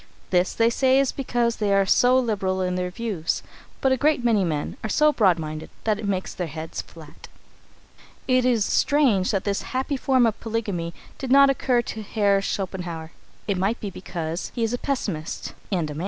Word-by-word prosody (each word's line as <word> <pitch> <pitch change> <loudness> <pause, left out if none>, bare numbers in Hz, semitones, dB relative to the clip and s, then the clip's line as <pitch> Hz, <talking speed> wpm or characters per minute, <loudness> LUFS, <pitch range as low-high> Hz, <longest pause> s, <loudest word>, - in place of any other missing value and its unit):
This, 180 0 +2
they 230 0 +3
say, 260 +2 +3
is 275 -2 +2
because 240 -3 -1
they 210 -2 0
are 195 0 +4
so 250 +6 +4
liberal 195 -6 0
in 180 -1 0
their 180 0 -1
views, 195 -5 -2 0.4
but 265 - +3
a 260 - +3
great 290 -1 +2
many 225 -5 +3
men 155 -4 -2
are 220 - -2
so 300 +6 +4
broad 190 -9 +4
minded 155 -1 -6
that 215 -2 +1
it 215 - -4
makes 190 -2 -2
their 180 - -3
heads 160 +1 -5
flat. 155 -3 -14 1.0
It 255 -1 +3
is 240 -4 +2
strange 250 -11 +2
that 195 -2 0
this 200 -1 -1
happy 265 +2 -2
form 260 -2 +3
of 220 -2 0
polygamy 205 -7 -3 0.2
did 260 -2 -4
not 275 0 +7
occur 250 -2 +1
to 220 - -6
Herr 200 -2 +1
Schopenhauer. 180 -5 -4 0.4
It 195 -3 0
may 195 +5 +1
be 205 -4 -6
because 170 -2 -5
he 235 - -1
was 225 +1 0
a 245 - -2
pessimist 200 - -3 0.2
and 170 -6 -1
a - - -5
man. 150 - -7
205 Hz, 200 wpm, -24 LUFS, 180-245 Hz, 1.0 s, not